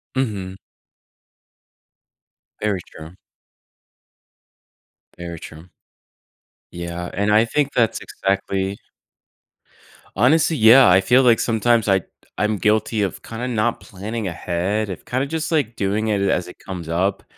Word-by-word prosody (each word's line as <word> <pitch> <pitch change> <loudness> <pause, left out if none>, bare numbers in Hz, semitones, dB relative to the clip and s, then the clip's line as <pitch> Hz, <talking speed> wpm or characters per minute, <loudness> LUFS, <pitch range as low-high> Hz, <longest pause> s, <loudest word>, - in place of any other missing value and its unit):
Mhm. 100 -7 -3 2.0
Very 100 -4 -1
true. 80 +4 -12 2.0
Very 85 -1 -7
true. 80 +3 -12 1.0
Yeah, 85 0 -5
and 100 +2 0
I 110 +2 +5
think 145 +3 0
that's 115 -4 +1
exactly 95 0 -2 1.4
Honestly, 155 +9 +3
yeah, 115 +2 +7
I 95 +2 +5
feel 130 +4 +4
like 120 -2 +5
sometimes 115 -1 +2
I 95 -1 +3 0.4
I'm 105 0 +1
guilty 105 +3 +1
of 100 - -2
kinda 115 +2 -5
not 115 -1 0
planning 105 +2 -6
ahead, 90 +5 -2
of 90 - -9
kinda 130 +3 -1
just, 160 +2 -3
like, 140 -8 0
doing 105 +3 -1
it 100 -2 +1
as 95 -2 0
it 90 - -13
comes 90 -4 -7
up. 95 +4 -1
105 Hz, 120 wpm, -21 LUFS, 95-115 Hz, 2.0 s, yeah